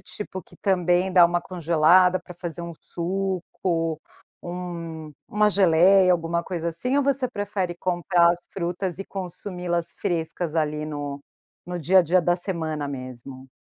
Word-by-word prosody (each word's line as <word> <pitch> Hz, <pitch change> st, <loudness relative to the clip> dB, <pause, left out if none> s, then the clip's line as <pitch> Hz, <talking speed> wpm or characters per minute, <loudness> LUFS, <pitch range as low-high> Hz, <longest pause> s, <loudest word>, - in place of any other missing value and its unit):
tipo 190 Hz, -3 st, -6 dB
que -, -, -19 dB
também 180 Hz, -1 st, +1 dB
dá 180 Hz, -2 st, +8 dB
uma 175 Hz, 0 st, +2 dB
congelada 175 Hz, +1 st, +4 dB
para 180 Hz, -, -12 dB
fazer 170 Hz, -1 st, -6 dB
um 170 Hz, 0 st, -6 dB
suco, 175 Hz, -2 st, -2 dB, 0.5 s
um 170 Hz, -3 st, -6 dB, 0.2 s
uma 210 Hz, 0 st, +3 dB
geleia, 185 Hz, 0 st, +5 dB
alguma 170 Hz, 0 st, 0 dB
coisa 170 Hz, -2 st, -3 dB
assim, 250 Hz, -, -1 dB
ou 285 Hz, -, +2 dB
você 270 Hz, -2 st, +1 dB
prefere 200 Hz, -5 st, -3 dB
comprar 175 Hz, -1 st, +3 dB
as 175 Hz, 0 st, -2 dB
frutas 180 Hz, 0 st, -3 dB
e 195 Hz, -, -5 dB
consumi-las 180 Hz, -2 st, -4 dB
frescas 165 Hz, -3 st, -2 dB
ali 150 Hz, -1 st, 0 dB
no 145 Hz, -2 st, -5 dB, 0.4 s
no 180 Hz, 0 st, -5 dB
dia 185 Hz, +4 st, +4 dB
a -, -, +1 dB
dia 175 Hz, +3 st, +3 dB
da 175 Hz, +1 st, +2 dB
semana 160 Hz, -5 st, -3 dB
mesmo? 130 Hz, 0 st, -8 dB
175 Hz, 150 wpm, -24 LUFS, 165-185 Hz, 0.5 s, dá